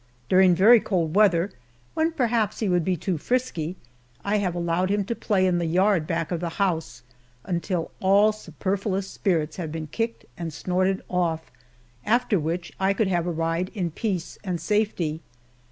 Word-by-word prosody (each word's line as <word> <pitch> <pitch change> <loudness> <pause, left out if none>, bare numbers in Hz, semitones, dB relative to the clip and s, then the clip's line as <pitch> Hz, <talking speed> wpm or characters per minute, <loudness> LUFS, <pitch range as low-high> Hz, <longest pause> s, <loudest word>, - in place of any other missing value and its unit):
During 185 -1 +6
very 220 +7 +7
cold 170 -7 -1
weather, 195 -2 +4 0.4
when 320 +1 +1
perhaps 235 -6 +1
he 220 - 0
would 180 -2 +2
be 185 +1 0
too 175 0 -2
frisky, 185 - -1 0.5
I 205 +1 +2
have 180 -3 -1
allowed 175 +2 0
him 205 0 +1
to 235 - -2
play 200 -4 +1
in 180 -1 +2
the 170 - -1
yard 185 -1 +2
back 165 -1 -2
of 175 - -1
the 175 0 -2
house, 165 -10 -1 0.4
until 175 -1 -2
all 200 +3 +5
superfluous 195 +1 -3
spirits 165 -6 -1
had 165 -4 -4
been 160 0 -4
kicked 225 +9 -3
and 165 -2 -3
snorted 185 +5 0
off, 170 -3 -1 0.5
after 235 -3 +2
which 170 +3 -3
I 190 +1 +2
could 200 0 +1
have 175 -2 0
a - - 0
ride 165 +2 -1
in 180 -5 -1
peace 185 -1 -3
and 180 -4 -2
safety. 175 -5 0
185 Hz, 170 wpm, -25 LUFS, 165-205 Hz, 0.5 s, very